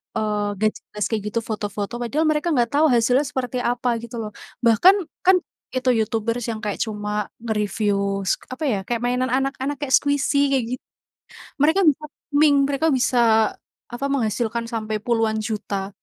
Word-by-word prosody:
eee, 210 Hz, -1 st, 0 dB, 0.2 s
gak 215 Hz, 0 st, +3 dB
jelas 210 Hz, -1 st, -5 dB
kayak 220 Hz, -3 st, -1 dB
gitu, 230 Hz, -, +1 dB
foto-foto." 210 Hz, +1 st, -4 dB
Padahal 245 Hz, +7 st, -1 dB
mereka 310 Hz, +2 st, +1 dB
nggak 240 Hz, -2 st, +2 dB
tahu 315 Hz, -, +5 dB
hasilnya 245 Hz, +4 st, +3 dB
seperti 255 Hz, -1 st, -3 dB
apa 240 Hz, 0 st, 0 dB
gitu 235 Hz, +1 st, -8 dB
loh. 210 Hz, -1 st, -5 dB, 0.3 s
Bahkan 240 Hz, -, +6 dB, 0.3 s
kan 375 Hz, 0 st, +7 dB, 0.4 s
itu 255 Hz, 0 st, 0 dB
YouTubers 230 Hz, 0 st, 0 dB
yang 220 Hz, -1 st, -4 dB
kayak 205 Hz, -1 st, -3 dB
cuma 210 Hz, -1 st, -3 dB
nge-review 205 Hz, -3 st, -1 dB
s -, -, +2 dB, 0.2 s
apa 295 Hz, -, -11 dB
ya, 210 Hz, -, +1 dB
kayak 235 Hz, -1 st, -1 dB
mainan 250 Hz, +1 st, 0 dB
anak-anak, 270 Hz, +1 st, -1 dB
kayak 275 Hz, -2 st, -3 dB
squishy 285 Hz, 0 st, +1 dB
kayak 260 Hz, -, +2 dB
git -, -, -53 dB, 0.8 s
mereka 320 Hz, +7 st, +3 dB
bisa 300 Hz, +1 st, -2 dB, 0.3 s
ming 290 Hz, -2 st, +5 dB
mereka 285 Hz, +3 st, +1 dB
bisa 250 Hz, -1 st, +1 dB, 0.7 s
apa, 245 Hz, +3 st, -4 dB
menghasilkan 230 Hz, -2 st, -1 dB
sampai 215 Hz, -2 st, -2 dB
puluhan 225 Hz, -1 st, +1 dB
juta. 210 Hz, -3 st, -3 dB
235 Hz, 160 wpm, -22 LUFS, 215-270 Hz, 0.8 s, kan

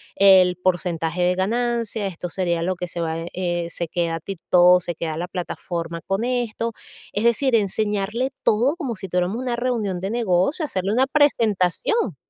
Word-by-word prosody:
el 185 Hz, -2 st, +6 dB
porcentaje 175 Hz, -1 st, -1 dB
de 180 Hz, +1 st, +2 dB
ganancia, 230 Hz, +1 st, -1 dB
esto 180 Hz, -1 st, -6 dB
sería 170 Hz, -2 st, -1 dB
lo 185 Hz, +2 st, 0 dB
que 180 Hz, -, -4 dB
se 170 Hz, 0 st, -5 dB
va, 160 Hz, -1 st, -2 dB, 0.2 s
eh, 175 Hz, -2 st, -2 dB
se 170 Hz, -, -4 dB
queda 165 Hz, -2 st, -1 dB
TikTok, 180 Hz, -1 st, +4 dB
se 175 Hz, -, -3 dB
queda 160 Hz, -2 st, -4 dB
la 175 Hz, +1 st, -3 dB
plataforma 170 Hz, -2 st, -4 dB
con 195 Hz, +4 st, -1 dB
esto. 235 Hz, -2 st, -2 dB, 0.4 s
Es 205 Hz, -, -2 dB
decir, 235 Hz, +2 st, +3 dB
enseñarle 210 Hz, +1 st, 0 dB, 0.2 s
todo 240 Hz, +8 st, +3 dB
como 270 Hz, -, -4 dB
si 190 Hz, 0 st, -6 dB
tuviéramos 180 Hz, +4 st, 0 dB
una 250 Hz, -1 st, -2 dB
reunión 230 Hz, -7 st, -1 dB
de 195 Hz, +2 st, -3 dB
negocio, 230 Hz, -, +1 dB
hacerle 195 Hz, -7 st, -2 dB
una 260 Hz, +3 st, +3 dB
presentación. 235 Hz, -, +1 dB
190 Hz, 165 wpm, -22 LUFS, 175-230 Hz, 0.4 s, el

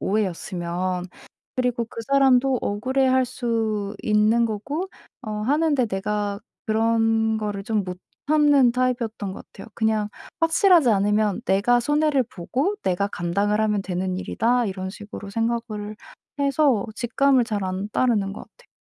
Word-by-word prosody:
오해였으면. 180 Hz, -2 st, -2 dB, 0.5 s
그리고 245 Hz, -2 st, 0 dB
그 230 Hz, -, -8 dB
사람도 270 Hz, -2 st, +4 dB
억울해할 260 Hz, +5 st, +1 dB
수 225 Hz, -5 st, -2 dB
있는 215 Hz, +2 st, +3 dB
거고 280 Hz, -, -4 dB, 0.3 s
어 220 Hz, -, -6 dB
하는데 285 Hz, +1 st, +2 dB
내가 205 Hz, 0 st, -2 dB, 0.3 s
그런 225 Hz, 0 st, +2 dB
거를 205 Hz, -2 st, -4 dB
좀 215 Hz, -2 st, 0 dB
못 180 Hz, -1 st, -6 dB, 0.3 s
참는 290 Hz, -5 st, +5 dB
타입이었던 235 Hz, -6 st, -1 dB
것 -, -, -10 dB
같아요. 205 Hz, -, -11 dB
그냥 220 Hz, -2 st, 0 dB, 0.3 s
'확실하지 330 Hz, -, +5 dB
않으면 210 Hz, 0 st, +2 dB
내가 205 Hz, +6 st, +3 dB
손해를 295 Hz, +1 st, +2 dB
보고 255 Hz, -, -2 dB
내가 190 Hz, +2 st, 0 dB
감당을 200 Hz, +4 st, -1 dB
하면 210 Hz, -2 st, +1 dB
되는 185 Hz, 0 st, -2 dB
일이다.' 240 Hz, +4 st, +1 dB
이런 190 Hz, -1 st, -4 dB
식으로 205 Hz, 0 st, -9 dB
생각을 225 Hz, -1 st, -3 dB, 0.4 s
해서 280 Hz, -5 st, +2 dB
직감을 250 Hz, +2 st, +2 dB
잘 210 Hz, -4 st, -2 dB
안 185 Hz, +2 st, -3 dB
따르는 210 Hz, -5 st, +1 dB
것 -, -, -8 dB
같아 -, -, -20 dB
220 Hz, 295 characters per minute, -23 LUFS, 205-255 Hz, 0.5 s, 참는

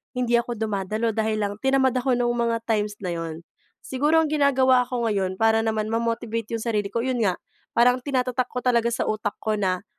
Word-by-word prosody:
hindi 245 Hz, -1 st, -1 dB
ako 235 Hz, 0 st, -4 dB
dumadalo 215 Hz, +1 st, -1 dB
dahil 215 Hz, -1 st, 0 dB
lang 200 Hz, 0 st, -1 dB
tinamad 265 Hz, -1 st, +3 dB
ako, 255 Hz, 0 st, +1 dB
no'ng 240 Hz, 0 st, +1 dB
mga 235 Hz, -1 st, 0 dB
times 210 Hz, -2 st, 0 dB
na 180 Hz, -2 st, -2 dB
'yon. 165 Hz, -1 st, -5 dB, 0.4 s
Siguro, 295 Hz, +5 st, +1 dB
ang -, -, -3 dB
ginagawa 265 Hz, -3 st, +4 dB
ko 245 Hz, -2 st, -1 dB
ngayon, 190 Hz, -4 st, -1 dB
para 225 Hz, +1 st, +3 dB
naman 220 Hz, -1 st, -1 dB
ma-motivate 230 Hz, -1 st, -2 dB
'yong 220 Hz, -, -6 dB
sarili 210 Hz, -3 st, -1 dB
ko, 230 Hz, +3 st, -2 dB
'yon 255 Hz, -3 st, -1 dB
nga, 190 Hz, -4 st, +1 dB, 0.4 s
parang 250 Hz, +2 st, +4 dB
tinatatak 255 Hz, -2 st, -1 dB
ko 250 Hz, 0 st, -5 dB
talaga 235 Hz, -2 st, +3 dB
sa 235 Hz, -, -1 dB
utak 215 Hz, -1 st, -2 dB
ko 215 Hz, -, -2 dB
na, 190 Hz, -1 st, -1 dB
230 Hz, 200 wpm, -24 LUFS, 215-250 Hz, 0.4 s, ginagawa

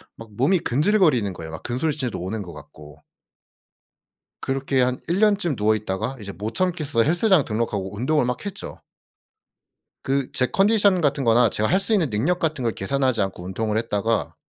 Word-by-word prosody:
막 115 Hz, -1 st, -12 dB
몸이 140 Hz, -, +2 dB
근질거리는 150 Hz, -, +2 dB
거예요. 80 Hz, -2 st, -9 dB
막 80 Hz, -, -9 dB
근손실도 130 Hz, 0 st, -2 dB
오는 100 Hz, +4 st, -4 dB
것 85 Hz, -, -10 dB
같고. 75 Hz, 0 st, -14 dB, 1.4 s
그렇게 135 Hz, 0 st, -1 dB
한 125 Hz, 0 st, 0 dB
1 175 Hz, +4 st, 0 dB
년쯤 205 Hz, -, +2 dB
누워 110 Hz, +1 st, +2 dB
있다가 105 Hz, +5 st, -3 dB
이제 100 Hz, -1 st, -7 dB
못 105 Hz, +3 st, -6 dB
참겠어 160 Hz, -9 st, 0 dB
헬스장 175 Hz, 0 st, +3 dB
등록하고 105 Hz, -3 st, -3 dB
운동을 130 Hz, +5 st, +1 dB
막 125 Hz, +7 st, -3 dB
했죠. 200 Hz, -, -7 dB, 1.2 s
그 135 Hz, -1 st, -1 dB
제 130 Hz, -, +2 dB
컨디션 200 Hz, -2 st, +3 dB
같은 145 Hz, -3 st, 0 dB
거나 115 Hz, 0 st, +4 dB
제가 105 Hz, +2 st, 0 dB
할 185 Hz, -, +3 dB
수 225 Hz, -, 0 dB
있는 175 Hz, -10 st, +2 dB
능력 145 Hz, +13 st, 0 dB
같은 155 Hz, -6 st, -1 dB
걸 115 Hz, -, +1 dB
계산하지 130 Hz, +1 st, 0 dB
않고 95 Hz, -2 st, -4 dB
운동을 105 Hz, +4 st, -2 dB
했다가 115 Hz, 0 st, -1 dB
125 Hz, 345 characters per minute, -23 LUFS, 105-160 Hz, 1.4 s, 거나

